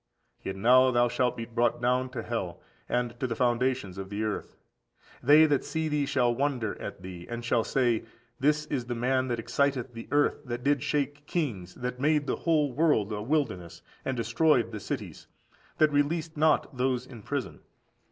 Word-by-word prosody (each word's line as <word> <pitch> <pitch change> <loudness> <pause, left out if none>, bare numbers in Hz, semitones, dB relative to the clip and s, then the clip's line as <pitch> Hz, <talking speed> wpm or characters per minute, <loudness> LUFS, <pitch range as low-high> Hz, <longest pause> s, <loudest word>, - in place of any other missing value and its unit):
Yet 95 - -4
now 125 +6 +5
thou 120 -1 +3
shalt 125 +1 0
be 115 - -4
brought 120 0 0
down 125 +1 +1
to 125 -3 -5
hell, 110 -8 -4 0.3
and 120 -1 0
to 130 - 0
the 115 - -3
foundations 120 -5 0
of 95 0 -6
the 105 +2 -3
earth! 105 -1 -4 0.6
They 150 +4 +7
that 145 -3 +1
see 160 -1 -2
thee 150 -2 0
shall 125 -4 +2
wonder 125 -4 -1
at - - -7
thee, 90 -2 -8
and 120 0 -5
shall 120 -1 +2
say, 120 -4 +1 0.3
This 150 +2 +2
is 135 -5 -3
the 120 - -2
man 130 +2 +1
that 120 -2 -1
excited 135 +1 0
the 115 0 -8
earth, 145 +1 +2
that 120 -1 -4
did 140 -1 +2
shake 145 +1 -2
kings, 100 - -3
that 125 0 -4
made 150 0 +2
the - - -1
whole 150 -5 +1
world 135 -8 +2
a 105 -1 -3
wilderness, 110 - -2 0.2
and 130 -1 -2
destroyed 120 +1 +2
the 105 - -5
cities, - - -6 0.5
that 155 -1 +4
released 155 +3 0
not 155 -2 +2
those 125 -1 0
in 120 -4 -11
prison. 115 - -4
125 Hz, 185 wpm, -28 LUFS, 115-145 Hz, 0.6 s, They